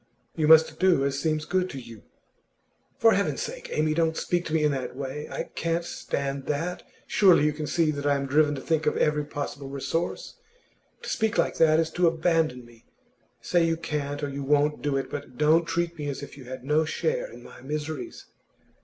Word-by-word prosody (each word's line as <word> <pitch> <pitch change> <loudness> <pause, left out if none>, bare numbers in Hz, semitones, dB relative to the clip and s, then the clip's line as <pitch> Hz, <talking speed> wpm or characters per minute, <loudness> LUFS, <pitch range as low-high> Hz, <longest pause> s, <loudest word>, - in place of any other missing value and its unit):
'You 155 -2 +1
must 160 0 +6
do 180 -7 +4
as 140 0 -1
seems 155 -1 -1
good 185 0 0
to 140 - -6
you.' 115 -4 -11 1.0
'For 225 -1 +5
Heaven's 200 - 0
sake, - - -7
Amy, 155 0 +1
don't 160 0 +1
speak 175 0 -1
to 155 - -4
me 155 - +2
in 150 - +3
that 130 -2 -4
way! 140 +2 -5
I - - -5
can't 170 +1 -1
stand 140 -4 -4
that! 165 +5 -2 0.2
Surely 180 -7 +5
you 150 - +2
can 150 0 -5
see 165 -1 +2
that 145 -1 -3
I 145 - +3
am 140 0 -2
driven 145 +2 +3
to 135 - -6
think 160 +1 0
of - - +1
every 150 0 +2
possible 145 -2 -6
resource. 150 +5 -3 0.7
To - - -5
speak 220 0 0
like - - +1
that 160 -1 +5
is 160 -1 0
to 175 +1 +2
abandon 160 -6 +1
me. 120 -1 -20 0.5
Say 175 -1 +2
you 165 0 0
can't 145 -2 -3
or 140 -1 -3
won't 145 +2 +2
do 145 -2 0
it, 135 -1 -2
but 140 -4 -7
don't 155 +3 +4
treat 170 +1 -1
me 145 - -3
as 140 0 -5
if - - -9
you 135 -2 -12
had 130 0 -8
no 150 +3 +2
share - - -2
in - - -12
my - - -13
miseries! 150 - -5
150 Hz, 205 wpm, -26 LUFS, 140-165 Hz, 1.0 s, must